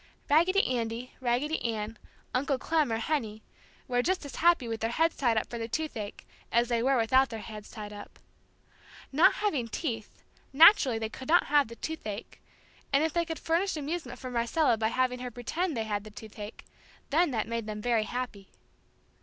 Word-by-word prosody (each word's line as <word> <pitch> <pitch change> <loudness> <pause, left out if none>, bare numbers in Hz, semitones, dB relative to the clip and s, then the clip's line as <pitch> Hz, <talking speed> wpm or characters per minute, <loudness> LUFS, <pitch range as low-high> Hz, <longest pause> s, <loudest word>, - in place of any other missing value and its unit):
Raggedy 360 +6 +4
Andy, 235 0 -2
Raggedy 260 +5 0
Ann, 220 -1 -3 0.3
Uncle 270 +2 +1
Clem, 305 -1 +1
or 225 - +1
Henny 225 -4 -2 0.4
were 245 -2 +2
just 365 +3 0
as 285 - -8
happy 335 -7 +4
with 225 -1 -4
their 225 - 0
heads 325 +7 +2
tied 235 -4 +1
up 220 - 0
for 235 - -6
the 225 - -3
toothache 235 -7 -4 0.3
as 235 +1 +3
they 235 -1 +1
were 265 +2 +3
without 260 +3 +4
their 225 - -5
heads 210 0 -9
tied 210 -1 -8
up. 205 0 -11 0.9
Not 300 +5 +5
having 305 - 0
teeth, 225 -3 -5 0.3
naturally 280 - +7
they 220 0 -2
could 260 +3 -9
not 345 +3 +5
have 290 -2 +3
the 230 - -10
toothache, 225 -8 -6 0.5
and 280 +2 +4
if 320 - 0
they 340 -1 +1
could 325 -1 -4
furnish 335 +2 0
amusement 300 -3 -4
for 255 - -7
Marcella 240 +4 +2
by 220 0 0
having 250 +1 0
her 250 0 -4
pretend 275 +7 -2
they 225 - 0
had 205 -2 -2
the 215 - -10
toothache, 210 0 -10 0.5
then 335 +4 +4
that 225 -5 -1
made 230 -1 -3
them 210 0 -4
very 225 -1 +1
happy. 240 -5 -5
245 Hz, 185 wpm, -29 LUFS, 225-305 Hz, 0.9 s, naturally